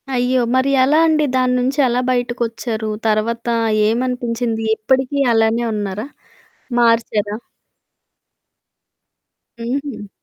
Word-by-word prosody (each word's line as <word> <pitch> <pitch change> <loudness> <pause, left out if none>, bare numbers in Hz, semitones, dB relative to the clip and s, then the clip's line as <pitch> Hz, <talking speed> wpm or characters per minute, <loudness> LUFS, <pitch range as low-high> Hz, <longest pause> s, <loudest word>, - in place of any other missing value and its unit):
అయ్యో! 250 +1 +1
మరి 260 +1 +2
ఎలా 295 +4 +3
అండి. 305 -1 +2
దాని 255 -1 +2
నుంచి 265 +4 -1
ఎలా 245 +1 0
బయటకొచ్చారు? 235 -2 -2 0.2
తర్వాత 230 +2 -1 0.4
ఏమనిపించింది? 235 -1 -1
ఇప్పటికి 265 +4 0 0.2
అలానే 225 +1 +2
ఉన్నారా? 205 +2 -4 0.7
మార్చారా? 225 -3 +1 2.2
హుహు. 240 -2 -5
240 Hz, 90 wpm, -18 LUFS, 225-255 Hz, 2.2 s, ఎలా